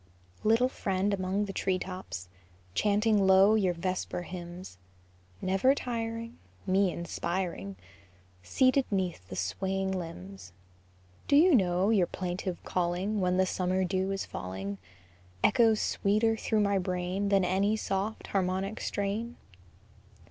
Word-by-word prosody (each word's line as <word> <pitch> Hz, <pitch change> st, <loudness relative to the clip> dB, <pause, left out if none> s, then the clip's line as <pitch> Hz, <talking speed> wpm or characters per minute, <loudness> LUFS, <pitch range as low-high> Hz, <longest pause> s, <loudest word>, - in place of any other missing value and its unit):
Little 225 Hz, +4 st, +4 dB
friend 200 Hz, -5 st, -1 dB
among 190 Hz, +1 st, 0 dB
the 195 Hz, -, -6 dB
tree 190 Hz, 0 st, 0 dB
tops, 185 Hz, -, -6 dB, 0.5 s
Chanting 210 Hz, -, +2 dB
low 190 Hz, +2 st, +6 dB
your 190 Hz, -5 st, +2 dB
vesper 180 Hz, 0 st, -3 dB
hymns, 175 Hz, -, -8 dB, 0.6 s
Never 195 Hz, +9 st, +3 dB
tiring, 230 Hz, -2 st, -4 dB, 0.3 s
Me 190 Hz, 0 st, +3 dB
inspiring, 170 Hz, -, -3 dB, 0.7 s
Seated 255 Hz, -, +3 dB
'neath 180 Hz, -, -2 dB
the -, -, -6 dB
swaying 190 Hz, -, -1 dB
limbs, 95 Hz, -, -7 dB, 0.7 s
Do 280 Hz, -, +4 dB
you 335 Hz, +4 st, +6 dB
know 185 Hz, -2 st, +3 dB
your 190 Hz, -6 st, +3 dB
plaintive 180 Hz, 0 st, -4 dB
calling, 180 Hz, +4 st, -1 dB
When 180 Hz, 0 st, +1 dB
the 190 Hz, -, +4 dB
summer 185 Hz, 0 st, 0 dB
dew 190 Hz, +1 st, 0 dB
is 195 Hz, 0 st, -2 dB
falling, 95 Hz, +2 st, -6 dB, 0.6 s
Echoes 225 Hz, -3 st, +4 dB
sweeter 215 Hz, +3 st, +1 dB
through 220 Hz, 0 st, 0 dB
my 200 Hz, -1 st, +2 dB
brain 185 Hz, +2 st, -2 dB
Than 195 Hz, -2 st, +3 dB
any 195 Hz, +4 st, +1 dB
soft, 200 Hz, +1 st, -2 dB
harmonic 190 Hz, +2 st, -1 dB
strain? 210 Hz, +4 st, -3 dB
190 Hz, 125 wpm, -29 LUFS, 180-210 Hz, 0.7 s, low